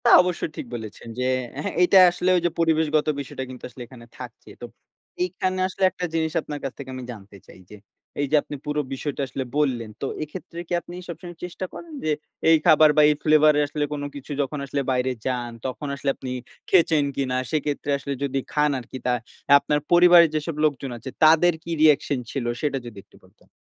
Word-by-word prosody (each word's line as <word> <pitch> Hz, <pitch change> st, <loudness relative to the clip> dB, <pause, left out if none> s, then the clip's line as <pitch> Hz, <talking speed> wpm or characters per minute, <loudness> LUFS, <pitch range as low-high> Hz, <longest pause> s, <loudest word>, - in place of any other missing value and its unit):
তা -, -, +6 dB
অবশ্য 180 Hz, -1 st, -3 dB, 0.2 s
ঠিক -, -, -5 dB
বলেছেন। 110 Hz, 0 st, -8 dB
যে, -, -, 0 dB, 0.4 s
হ্যাঁ, -, -, -3 dB
এইটা 180 Hz, +2 st, +6 dB
আসলে 180 Hz, +1 st, -1 dB
ওইযে 175 Hz, 0 st, +1 dB
পরিবেশগত 160 Hz, -2 st, +2 dB
বিষয়টা 130 Hz, -1 st, -5 dB
কিন্তু 130 Hz, -1 st, -10 dB
আসলে 125 Hz, -, -12 dB
এখানে 120 Hz, -1 st, -13 dB
থাকছে। 125 Hz, -3 st, -10 dB
তো -, -, -5 dB, 0.6 s
এইখানে 185 Hz, +1 st, -2 dB
আসলে 190 Hz, +1 st, -5 dB
একটা 180 Hz, -, -4 dB
জিনিস 160 Hz, -1 st, 0 dB
আপনার 150 Hz, -1 st, -6 dB
কাছ 135 Hz, -, -3 dB
থেকে 140 Hz, -2 st, -8 dB
আমি 130 Hz, -, -6 dB
জানতে 100 Hz, -3 st, -12 dB
চাই -, -, -15 dB
যে, -, -, -11 dB, 0.5 s
এইযে 145 Hz, +2 st, +1 dB
আপনি 145 Hz, -, -8 dB
পুরো 150 Hz, 0 st, -1 dB
বিষয়টা 140 Hz, +1 st, -4 dB
আসলে 130 Hz, +1 st, -4 dB
বললেন। 125 Hz, -7 st, 0 dB
তো -, -, -1 dB, 0.2 s
এক্ষেত্রে 170 Hz, +2 st, -9 dB
কি -, -, -4 dB
আপনি 175 Hz, -, -11 dB
সবসময় 175 Hz, 0 st, -8 dB
চেষ্টা 180 Hz, +1 st, -5 dB
করেন 335 Hz, -2 st, -10 dB
যে 155 Hz, -, +1 dB, 0.4 s
এই 165 Hz, -, +7 dB
খাবার 155 Hz, 0 st, +7 dB
বা, -, -, +8 dB
এই 150 Hz, -, +3 dB
ফ্লেভার 155 Hz, 0 st, +5 dB
এ -, -, +4 dB
আসলে 150 Hz, +1 st, -2 dB
কোন 145 Hz, -1 st, -4 dB
কিছু 140 Hz, +1 st, -9 dB
যখন 140 Hz, +1 st, -3 dB
আসলে 140 Hz, +1 st, -2 dB
বাইরে 130 Hz, 0 st, +1 dB
যান, 125 Hz, -2 st, -2 dB
তখন 130 Hz, +3 st, -4 dB
আসলে 140 Hz, 0 st, -2 dB
আপনি 130 Hz, -, -7 dB, 0.4 s
খেয়েছেন 160 Hz, -4 st, +4 dB
কিনা? 130 Hz, -2 st, -1 dB, 0.2 s
সেক্ষেত্রে 145 Hz, -1 st, -1 dB
আসলে 140 Hz, 0 st, -4 dB
যদি 135 Hz, -1 st, -1 dB
খান 150 Hz, 0 st, +3 dB
আরকি, 125 Hz, +1 st, -9 dB
তা 125 Hz, -, +2 dB, 0.5 s
আপনার 150 Hz, +1 st, 0 dB
পরিবারের 175 Hz, -1 st, +7 dB
যেসব 155 Hz, +1 st, -2 dB
লোকজন 140 Hz, -3 st, -1 dB
আছে, 120 Hz, +3 st, -8 dB
তাদের 165 Hz, +3 st, +6 dB
কি 170 Hz, -, -6 dB
রিঅ্যাকশন 145 Hz, -3 st, +4 dB
ছিল? 135 Hz, -4 st, -3 dB, 0.2 s
সেটা 145 Hz, -2 st, 0 dB
যদি 115 Hz, -3 st, -10 dB
একটু -, -, -24 dB
বলতেন। -, -, -26 dB
150 Hz, 200 wpm, -24 LUFS, 130-160 Hz, 0.6 s, বা